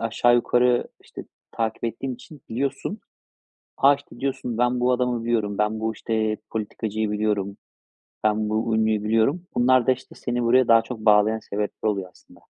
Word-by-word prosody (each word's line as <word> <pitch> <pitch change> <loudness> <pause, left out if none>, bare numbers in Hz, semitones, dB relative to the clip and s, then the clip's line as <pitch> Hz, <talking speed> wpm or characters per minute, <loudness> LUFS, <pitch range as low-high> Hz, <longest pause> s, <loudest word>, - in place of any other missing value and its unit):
aşağı 115 +2 +2
yukarı, 120 +1 +2 0.2
işte, - - -9 0.3
takip 115 0 -2
ettiğin 120 +3 -3
için 150 +4 -14
biliyorsun. 135 - -3 0.8
"A!" 140 +1 +6
işte, 140 -3 -15
diyorsun, 130 -3 -3
"Ben, 125 +1 +1
bu 125 +1 +2
adamı 125 -2 0
biliyorum. 110 -4 -1
Ben, 105 +1 0
bu, 110 0 -1
işte, 110 -1 -1
politikacıyı 110 0 -3
biliyorum. 105 -2 -1 0.7
Ben, 110 0 +1
bu 110 +1 0
ünlüyü 110 -1 +1
biliyorum." 115 +10 +2
Bunlar 125 0 +4
da, 130 - +5
işte, 130 0 -9
seni 120 -1 -3
buraya 125 +2 +4
daha 115 -1 +6
çok 115 +1 -7
bağlayan 105 0 +4
sebepler 105 0 -3
oluyor 95 -3 -4
aslında. - - -21
115 Hz, 165 wpm, -24 LUFS, 110-125 Hz, 0.8 s, A